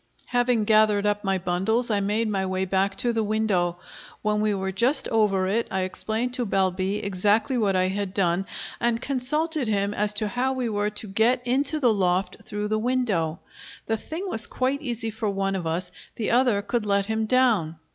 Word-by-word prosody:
Having 245 Hz, -2 st, +2 dB
gathered 215 Hz, -1 st, +4 dB
up 205 Hz, 0 st, 0 dB
my 195 Hz, -1 st, +1 dB
bundles, 190 Hz, +7 st, 0 dB
I 205 Hz, -, +2 dB
made 210 Hz, +3 st, 0 dB
my 195 Hz, -2 st, -1 dB
way 185 Hz, 0 st, -1 dB
back 195 Hz, +1 st, 0 dB
to 240 Hz, +4 st, +1 dB
the 225 Hz, -1 st, 0 dB
window. 205 Hz, -5 st, 0 dB, 0.5 s
When 210 Hz, 0 st, +1 dB
we 215 Hz, 0 st, +2 dB
were 190 Hz, 0 st, -2 dB
just 240 Hz, +9 st, +3 dB
over 205 Hz, -4 st, +2 dB
it 220 Hz, +5 st, 0 dB
I 190 Hz, -, -1 dB
explained 220 Hz, +6 st, -2 dB
to 250 Hz, -2 st, -1 dB
Balbi 190 Hz, +1 st, 0 dB
exactly 205 Hz, +6 st, +1 dB
what 205 Hz, -5 st, +1 dB
I 185 Hz, 0 st, +2 dB
had 200 Hz, 0 st, -3 dB
done, 185 Hz, 0 st, +1 dB, 0.3 s
and 235 Hz, -1 st, +1 dB
consulted 280 Hz, +3 st, -1 dB
him 200 Hz, -1 st, 0 dB
as 210 Hz, 0 st, -1 dB
to 215 Hz, +1 st, 0 dB
how 250 Hz, +5 st, 0 dB
we 255 Hz, -3 st, -2 dB
were 205 Hz, -1 st, 0 dB
to 210 Hz, +1 st, -5 dB
get 230 Hz, +5 st, +2 dB
into 280 Hz, +5 st, +1 dB
the 245 Hz, -6 st, +4 dB
loft 185 Hz, -1 st, 0 dB
through 210 Hz, 0 st, -4 dB
the 215 Hz, 0 st, +1 dB
window. 215 Hz, -10 st, 0 dB, 0.4 s
The 225 Hz, -, 0 dB
thing 330 Hz, -, -6 dB
was 225 Hz, -, -4 dB
quite 265 Hz, +3 st, -1 dB
easy 235 Hz, -5 st, -3 dB
for 220 Hz, 0 st, -2 dB
one 195 Hz, 0 st, -1 dB
of 175 Hz, -3 st, -3 dB
us; 165 Hz, +3 st, -3 dB, 0.2 s
the 220 Hz, -, -2 dB
other 240 Hz, -5 st, +3 dB
could 235 Hz, +1 st, -1 dB
let 200 Hz, -1 st, +1 dB
him 220 Hz, +1 st, -1 dB
down. 220 Hz, -11 st, +2 dB
210 Hz, 195 wpm, -25 LUFS, 195-240 Hz, 0.5 s, gathered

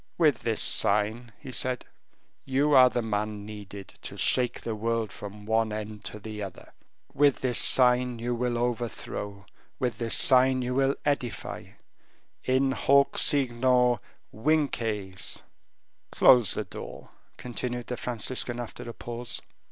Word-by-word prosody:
"With 150 Hz, -8 st, +3 dB
this 115 Hz, -2 st, +1 dB
sign," 105 Hz, +4 st, +2 dB
he 135 Hz, -, -10 dB
said, 125 Hz, 0 st, 0 dB, 0.6 s
"you 140 Hz, +3 st, +1 dB
are 130 Hz, -2 st, +7 dB
the 120 Hz, -1 st, -2 dB
man 105 Hz, -1 st, -3 dB
needed 100 Hz, -2 st, -9 dB
to -, -, -8 dB
shake 125 Hz, -1 st, +2 dB
the 115 Hz, -, -4 dB
world 115 Hz, 0 st, -2 dB
from 105 Hz, 0 st, -10 dB
one 110 Hz, 0 st, +1 dB
end 105 Hz, 0 st, -6 dB
to -, -, -5 dB
the 105 Hz, 0 st, -8 dB
other; 95 Hz, -4 st, -9 dB, 0.4 s
with 145 Hz, -1 st, +2 dB
this 125 Hz, -2 st, +1 dB
sign 125 Hz, -1 st, +5 dB
you 120 Hz, +1 st, -3 dB
will 120 Hz, 0 st, -1 dB
overthrow; 115 Hz, -4 st, -4 dB, 0.3 s
with 125 Hz, -2 st, -2 dB
this 115 Hz, -1 st, 0 dB
sign 130 Hz, -1 st, +5 dB
you 125 Hz, +1 st, -2 dB
will 135 Hz, +1 st, +1 dB
edify; 140 Hz, -5 st, -3 dB, 0.8 s
in 130 Hz, +1 st, +1 dB
hoc 140 Hz, +1 st, +2 dB
signo 125 Hz, -3 st, +2 dB, 0.3 s
vinces!" 110 Hz, -8 st, -1 dB, 0.7 s
"Close 125 Hz, -4 st, +5 dB
the 105 Hz, -, -3 dB
door," -, -, -10 dB, 0.3 s
continued 120 Hz, 0 st, -5 dB
the 125 Hz, -, -4 dB
Franciscan 120 Hz, 0 st, -2 dB
after 120 Hz, 0 st, -7 dB
a -, -, -7 dB
pause. 120 Hz, 0 st, -6 dB
120 Hz, 135 wpm, -27 LUFS, 110-130 Hz, 0.8 s, are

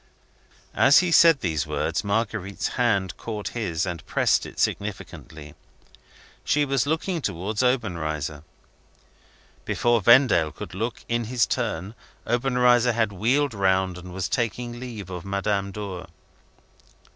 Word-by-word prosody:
As 135 Hz, +2 st, +5 dB
he 180 Hz, -1 st, +3 dB
said 165 Hz, -4 st, +6 dB
those 80 Hz, -5 st, -1 dB
words, -, -, -2 dB
Marguerite's 100 Hz, -2 st, -2 dB
hand 100 Hz, -7 st, 0 dB
caught 105 Hz, -3 st, -5 dB
his, 90 Hz, -9 st, -2 dB
and 85 Hz, -4 st, -5 dB
pressed -, -, +1 dB
it -, -, -13 dB
significantly. 80 Hz, -7 st, -4 dB, 0.9 s
She 150 Hz, 0 st, +2 dB
was 135 Hz, -1 st, 0 dB
looking 160 Hz, +3 st, -1 dB
towards 100 Hz, +1 st, -2 dB
Obenreizer. 80 Hz, -, -1 dB, 1.2 s
Before 120 Hz, -1 st, +1 dB
Vendale 100 Hz, -, +5 dB
could 85 Hz, -, -9 dB
look, 115 Hz, +5 st, -4 dB
in 120 Hz, 0 st, -1 dB
his 120 Hz, +1 st, +1 dB
turn, 105 Hz, -5 st, -3 dB, 0.3 s
Obenreizer 125 Hz, 0 st, +3 dB
had 110 Hz, -2 st, 0 dB
wheeled 125 Hz, +8 st, +1 dB
round, 95 Hz, -2 st, +1 dB
and 90 Hz, 0 st, -10 dB
was 95 Hz, 0 st, -3 dB
taking 120 Hz, +1 st, -2 dB
leave 110 Hz, -7 st, -8 dB
of 90 Hz, -1 st, -6 dB
Madame 100 Hz, 0 st, -1 dB
Dor. 100 Hz, -3 st, -7 dB
105 Hz, 125 wpm, -24 LUFS, 95-120 Hz, 1.2 s, said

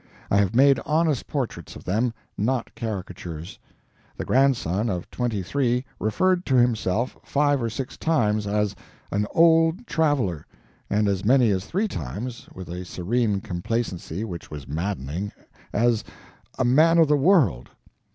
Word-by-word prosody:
I 100 Hz, -, +4 dB
have 100 Hz, +1 st, +2 dB
made 135 Hz, +2 st, +6 dB
honest 155 Hz, -5 st, +1 dB
portraits -, -, -4 dB
of -, -, -10 dB
them, 110 Hz, +6 st, 0 dB, 0.2 s
not 120 Hz, +3 st, -1 dB
caricatures. 90 Hz, -6 st, -6 dB, 0.6 s
The -, -, -4 dB
Grandson 120 Hz, -6 st, +2 dB
of 90 Hz, -3 st, -3 dB
twenty 115 Hz, -6 st, -2 dB
three 125 Hz, +4 st, 0 dB
referred 180 Hz, -, +1 dB
to 135 Hz, -, +2 dB
himself 120 Hz, -2 st, +1 dB
five 145 Hz, -1 st, +1 dB
or 115 Hz, -, -1 dB
six 125 Hz, +3 st, -5 dB
times 105 Hz, -10 st, +1 dB
as 105 Hz, 0 st, 0 dB, 0.4 s
an 105 Hz, +1 st, 0 dB
"old 165 Hz, +5 st, +4 dB
traveler," 145 Hz, -, 0 dB, 0.4 s
and 105 Hz, 0 st, +2 dB
as 100 Hz, -2 st, 0 dB
many 125 Hz, 0 st, +4 dB
as 95 Hz, 0 st, -1 dB
three 200 Hz, +5 st, 0 dB
times 115 Hz, -, -6 dB
(with 95 Hz, -1 st, -9 dB
a 90 Hz, +1 st, -5 dB
serene 100 Hz, +3 st, -1 dB
complacency 95 Hz, -1 st, -3 dB
which 90 Hz, -7 st, -7 dB
was 75 Hz, -4 st, -8 dB
maddening) 85 Hz, +3 st, -3 dB, 0.4 s
as 115 Hz, 0 st, +2 dB, 0.5 s
a 130 Hz, -, +1 dB
"man 155 Hz, +7 st, +5 dB
of 165 Hz, -2 st, +6 dB
the 150 Hz, -, +4 dB
world." 140 Hz, -, +3 dB
115 Hz, 145 wpm, -24 LUFS, 95-135 Hz, 0.6 s, made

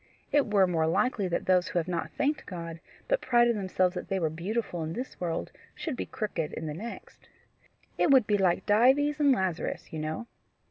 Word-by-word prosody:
It 285 Hz, -7 st, +2 dB
were 200 Hz, -2 st, +5 dB
more 165 Hz, -3 st, +1 dB
likely 205 Hz, +3 st, +1 dB
that 175 Hz, -, -2 dB
those 185 Hz, -1 st, +3 dB
who -, -, -3 dB
have 170 Hz, 0 st, 0 dB
not 175 Hz, -2 st, -2 dB
thanked 295 Hz, +1 st, 0 dB
God, 170 Hz, -3 st, -6 dB, 0.3 s
but -, -, +1 dB
prided 240 Hz, -2 st, +3 dB
themselves 185 Hz, -2 st, +1 dB
that 180 Hz, -, -5 dB
they 195 Hz, -, -1 dB
were 160 Hz, -3 st, 0 dB
beautiful 180 Hz, +2 st, -3 dB
in 160 Hz, 0 st, -3 dB
this 250 Hz, +6 st, -6 dB
world, 170 Hz, -2 st, -2 dB, 0.2 s
should 315 Hz, -6 st, -4 dB
be -, -, -4 dB
crooked 205 Hz, -8 st, -3 dB
in 160 Hz, -, -5 dB
the 150 Hz, -, -3 dB
next. 220 Hz, +9 st, -9 dB, 0.7 s
It -, -, +4 dB
would 265 Hz, -5 st, +6 dB
be 205 Hz, -1 st, +1 dB
like 180 Hz, -3 st, +2 dB
Dives 265 Hz, +8 st, +4 dB
and 285 Hz, -2 st, +5 dB
Lazarus, 190 Hz, -10 st, -2 dB
you 160 Hz, -, -3 dB
know. 155 Hz, +8 st, -3 dB
190 Hz, 200 wpm, -29 LUFS, 170-240 Hz, 0.7 s, would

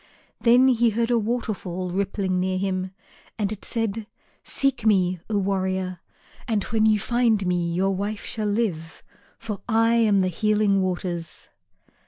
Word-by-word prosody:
Then 245 Hz, +2 st, +5 dB
he 240 Hz, -2 st, +3 dB
heard 230 Hz, +2 st, 0 dB
a 235 Hz, -, +3 dB
waterfall 205 Hz, -6 st, -3 dB
rippling 195 Hz, -1 st, -1 dB
near 185 Hz, 0 st, 0 dB
him 185 Hz, -1 st, -1 dB, 0.5 s
and 205 Hz, -2 st, -1 dB
it 215 Hz, -, -6 dB
said, 225 Hz, -2 st, -2 dB, 0.4 s
"Seek 275 Hz, -4 st, -1 dB
me, 185 Hz, -4 st, +3 dB
O 210 Hz, -, +1 dB
warrior, 190 Hz, -2 st, -1 dB, 0.5 s
and 215 Hz, -4 st, 0 dB
when 220 Hz, -1 st, +1 dB
you 215 Hz, -1 st, +4 dB
find 230 Hz, -3 st, +1 dB
me 175 Hz, -1 st, 0 dB
your 190 Hz, +3 st, +1 dB
wife 200 Hz, +2 st, -3 dB
shall 215 Hz, -2 st, -3 dB
live, 190 Hz, -7 st, -2 dB, 0.3 s
for 215 Hz, -4 st, -6 dB
I 225 Hz, +1 st, +3 dB
am 215 Hz, -4 st, +4 dB
the 185 Hz, -, +2 dB
Healing 210 Hz, +1 st, +2 dB
Waters." 175 Hz, -3 st, -3 dB
200 Hz, 150 wpm, -24 LUFS, 185-225 Hz, 0.5 s, Then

